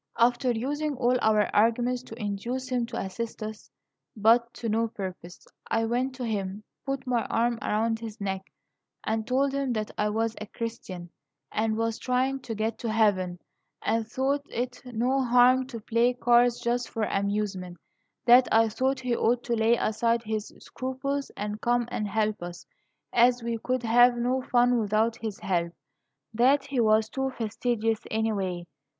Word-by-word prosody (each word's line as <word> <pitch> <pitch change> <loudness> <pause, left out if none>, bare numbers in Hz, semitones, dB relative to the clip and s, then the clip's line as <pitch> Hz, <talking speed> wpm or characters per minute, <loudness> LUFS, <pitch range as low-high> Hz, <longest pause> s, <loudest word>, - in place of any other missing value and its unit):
"After 245 +2 +3
using 285 +6 -1
all 250 0 +2
our 215 -1 +2
arguments 240 +3 +2
to 225 - -10
induce 235 +5 -3
him 245 -2 0
to - - -6
assist 220 +4 -5
us, 215 0 -7 0.5
but 230 +3 +4
to 235 - -5
no 225 +1 +1
purpose, 185 -4 -8 0.2
I 225 0 +1
went 250 +3 -1
to 255 -1 -4
him, 205 -2 -3 0.2
put 270 -1 -2
my 245 -2 +1
arm 235 0 0
around 225 +1 0
his 225 -1 -8
neck, 190 -1 -4 0.5
and 220 0 -2
told 270 +2 +1
him 275 -2 0
that 215 -2 -3
I 210 - +2
was 225 +1 -1
a 215 - -5
Christian, 195 -7 -6 0.4
and 220 0 0
was 230 0 -1
trying 260 +2 0
to 235 -3 -6
get 220 +1 -2
to 230 - -2
heaven, 195 -5 +2 0.5
and 225 -1 0
thought 270 +4 0
it 245 +1 -4
no 250 +3 0
harm 250 +1 +5
to 240 -4 -7
play 235 +3 +1
cards 245 -1 +4
just 240 0 -1
for 225 - -2
amusement; 195 -3 -2 0.5
that 250 +1 +7
I 225 0 +5
thought 260 +4 0
he 250 -2 0
ought 240 +1 +1
to 240 - -2
lay 225 +1 +3
aside 230 +2 +1
his 215 -1 -3
scruples, 275 +2 -3
and 210 +1 -4
come 240 0 +1
and 210 - -2
help 215 0 0
us, 175 0 -7 0.5
as 245 0 +4
we 230 -1 -2
could 255 +2 -1
have 240 +1 +5
no 250 +2 0
fun 245 -1 +3
without 220 +2 +1
his 220 -4 -5
nelp; 170 -2 0 0.6
that 265 +5 +3
he 275 -2 -2
was 220 -1 +4
too 265 +4 -2
fastidious, 225 -1 -1
anyway. 195 -6 -1
230 Hz, 170 wpm, -27 LUFS, 215-245 Hz, 0.6 s, that